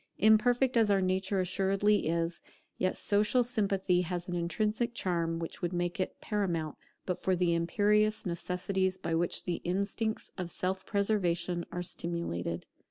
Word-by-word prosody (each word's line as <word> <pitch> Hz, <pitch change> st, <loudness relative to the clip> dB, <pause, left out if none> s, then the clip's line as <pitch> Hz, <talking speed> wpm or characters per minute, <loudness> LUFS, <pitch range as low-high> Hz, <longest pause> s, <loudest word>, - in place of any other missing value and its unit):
Imperfect 245 Hz, +4 st, +4 dB
as 225 Hz, -2 st, +4 dB
our 200 Hz, -1 st, +4 dB
nature 190 Hz, +1 st, 0 dB
assuredly 195 Hz, +2 st, +2 dB
is, 165 Hz, +1 st, -1 dB, 0.4 s
yet 185 Hz, -, +1 dB
social 210 Hz, +5 st, +3 dB
sympathy 195 Hz, -6 st, +1 dB
has 175 Hz, 0 st, -3 dB
an 180 Hz, -, -4 dB
intrinsic 215 Hz, +7 st, -1 dB
charm 170 Hz, -5 st, 0 dB
which 165 Hz, 0 st, -5 dB
would 175 Hz, 0 st, -1 dB
make 175 Hz, +3 st, -1 dB
it 185 Hz, -, -2 dB
paramount, 175 Hz, -8 st, -1 dB, 0.3 s
but 180 Hz, -, -2 dB
for 185 Hz, -, +1 dB
the 175 Hz, -1 st, +2 dB
imperious 210 Hz, +6 st, +2 dB
necessities 185 Hz, +2 st, -1 dB
by 170 Hz, -3 st, -3 dB
which 170 Hz, +1 st, 0 dB
the 175 Hz, -, -2 dB
instincts 200 Hz, +5 st, -2 dB
of 180 Hz, -2 st, -3 dB
self 190 Hz, +2 st, -3 dB
preservation 180 Hz, -4 st, 0 dB
are 180 Hz, -, -3 dB
stimulated. 85 Hz, -, -3 dB
185 Hz, 150 wpm, -31 LUFS, 175-205 Hz, 0.4 s, Imperfect